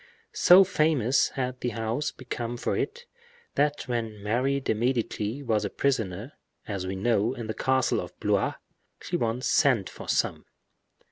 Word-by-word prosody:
So 185 +2 +8
famous 155 - +2
had 130 -2 -3
the 125 - 0
house 115 +7 -1
become 120 -2 -5
for - - -1
it, 480 0 -3 0.5
that 145 0 +1
when 115 -4 -3
Mary 130 +6 +1
de 135 - 0
Medici 120 +1 -1
was 110 -4 +1
a 100 - -1
prisoner, 115 -2 -1 0.3
as 95 -3 -3
we 95 - -3
know, 115 +4 +1
in 120 - -6
the 110 - -3
castle 130 +1 +1
of - - -10
Blois, - - +1 0.4
she - - -4
once 120 +2 -1
sent 125 -8 +3
for - - -10
some. - - 0
120 Hz, 155 wpm, -27 LUFS, 110-135 Hz, 0.5 s, So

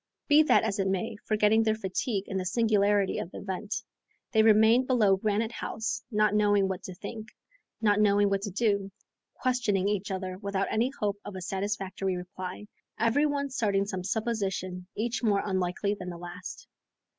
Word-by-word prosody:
Be 300 +1 +7
that 310 - +4
as 215 -2 -1
it 195 - +1
may, 195 +4 -1
forgetting 215 +1 +4
their 220 -1 +2
fatigue 200 +1 -2
in 195 - -3
the 185 - -1
singularity 205 -2 +2
of - - -5
the - - -10
event, 200 +3 -4 0.6
they 220 -3 +4
remained 220 +3 +5
below 215 -7 +4
Granite 215 +3 0
House, 225 -1 -3
not 210 -2 +2
knowing 205 -2 +3
what 190 0 -3
to 185 - -7
think, 220 +3 -7 0.5
not 205 -2 +3
knowing 205 -1 +4
what 195 0 0
to 205 - -3
do, 200 -1 0 0.4
questioning 235 -7 +1
each 205 -1 -1
other 185 -1 -4
without 200 -1 -1
any 230 +4 +2
hope 205 -1 -1
of 205 - -8
a 185 - -5
satisfactory 190 0 -2
reply, 185 +2 -7 0.3
every 235 +7 +3
one 280 -1 -2
starting 200 -6 +1
some 190 -3 -4
supposition 195 -4 -2
each 235 +2 -2
more 210 -4 +2
unlikely 190 +1 0
than 185 -3 -6
the 175 - -6
last. 175 +1 -8
205 Hz, 175 wpm, -28 LUFS, 190-220 Hz, 0.6 s, Be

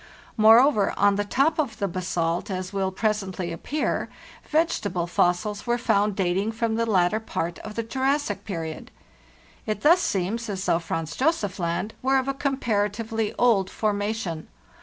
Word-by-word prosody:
Moreover, 225 +1 +5
on 200 0 +4
the 205 - 0
top 275 +10 +1
of 255 -8 -1
the 200 - -1
basalt, 175 0 -2
as 185 0 -4
will 190 -1 0
presently 190 -3 -2
appear, 290 - -2 0.4
vegetable 215 - 0
fossils 180 +5 0
were 240 0 +2
found 205 -3 +1
dating 195 +3 0
from 225 0 -1
the 230 +1 0
later 190 +1 +3
part 170 -6 -4
of 215 0 -8
the 230 - -1
Jurassic 260 -3 -1
period. 165 -6 -5 0.8
It 215 -1 -2
thus 340 +4 +5
seems 215 - -1
as 190 -1 -3
though 165 - +2
Franz 165 -1 -4
Josef 255 - 0
Land 170 +5 -2
were 270 +1 +3
of 260 0 0
a 275 - 0
comparatively 225 -5 -1
old 210 -6 +3
formation. 205 -5 -2
210 Hz, 155 wpm, -25 LUFS, 185-230 Hz, 0.8 s, Moreover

